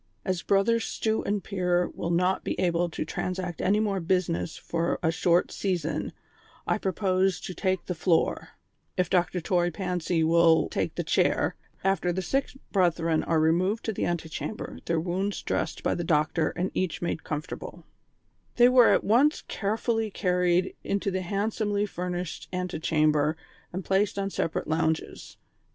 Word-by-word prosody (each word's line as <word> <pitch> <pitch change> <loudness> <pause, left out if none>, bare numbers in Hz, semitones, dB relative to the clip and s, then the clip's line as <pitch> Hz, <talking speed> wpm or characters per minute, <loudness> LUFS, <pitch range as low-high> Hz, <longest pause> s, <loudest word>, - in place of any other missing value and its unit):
"As 185 -2 -1
Brothers 225 +4 +2
Stew 220 0 -1
and 200 -1 -1
Pier 180 -3 0
will 170 - -4
not 180 +2 +1
be - - -3
able 175 -1 +1
to 160 - -4
transact 180 +1 -3
any 200 +3 +3
more 205 -3 0
business 170 -1 -1
for 170 0 -1
a 160 - +3
short 170 +1 +2
season, 165 -6 -2 0.5
I - - 0
propose 190 -2 +1
to 185 - -6
take 185 0 -1
the 180 - -2
floor, 165 0 +1 0.5
if 180 -1 0
Dr. 180 0 +2
Toy 175 +1 +1
Pancy 175 -2 -1
will 165 0 +4
take - - -2
the - - -2
chair, - - +1 0.3
after 195 -2 +1
the 185 +2 -2
sick 270 +9 0 0.2
brethren 165 -4 +2
are 165 -1 +2
removed 180 +7 +2
to 220 - -1
the - - -1
anti 170 -2 -2
chamber, 215 +6 -6
their 170 -1 +1
wounds 190 +4 -2
dressed - - -2
by - - +1
the 175 - -2
doctor 155 0 +1
and 180 +2 -2
each 185 -2 -2
made 170 - -2
comfortable," 150 -1 -6 0.7
They 245 0 +7
were 250 -2 +6
at - - +2
once 260 +8 +3
carefully 220 +2 -1
carried 180 -2 +1
into 200 0 -1
the 185 0 -1
handsomely 205 +2 -1
furnished 180 -3 -4
anti 180 -3 -3
chamber 155 -1 +2 0.3
and 185 +1 -5
placed 195 +1 +1
on 195 0 -1
separate 165 - -2
lounges. 160 0 -2
180 Hz, 160 wpm, -27 LUFS, 170-195 Hz, 0.7 s, They